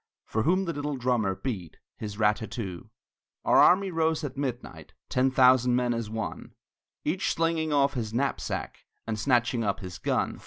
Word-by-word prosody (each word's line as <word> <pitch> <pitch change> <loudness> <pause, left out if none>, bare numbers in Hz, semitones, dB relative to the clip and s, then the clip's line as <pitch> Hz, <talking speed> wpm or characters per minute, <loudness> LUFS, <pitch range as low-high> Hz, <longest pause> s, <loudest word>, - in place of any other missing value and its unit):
For 110 - -1
whom 185 - +2
the 170 - -2
little 145 -1 -3
drummer 120 -6 +1
beat 95 - -5 0.2
His 105 -2 -6
rat 105 -1 +3
tat 110 - -7
too. 95 -3 -6 0.6
Our - - +4
army 190 +1 +5
rose 160 -1 0
at 140 -2 -4
midnight, 130 -3 -5 0.2
Ten 130 +1 +2
thousand 125 -1 +5
men 125 -1 +1
as 115 -2 -3
one, 110 0 -5 0.5
Each 175 +5 0
slinging 165 -1 0
off 140 -1 +3
his 115 -5 -3
knapsack 135 +4 -3 0.2
And 110 -1 -3
snatching 120 -1 +2
up 100 -3 -1
his 90 -2 -8
gun. - - -1
125 Hz, 170 wpm, -27 LUFS, 110-145 Hz, 0.6 s, army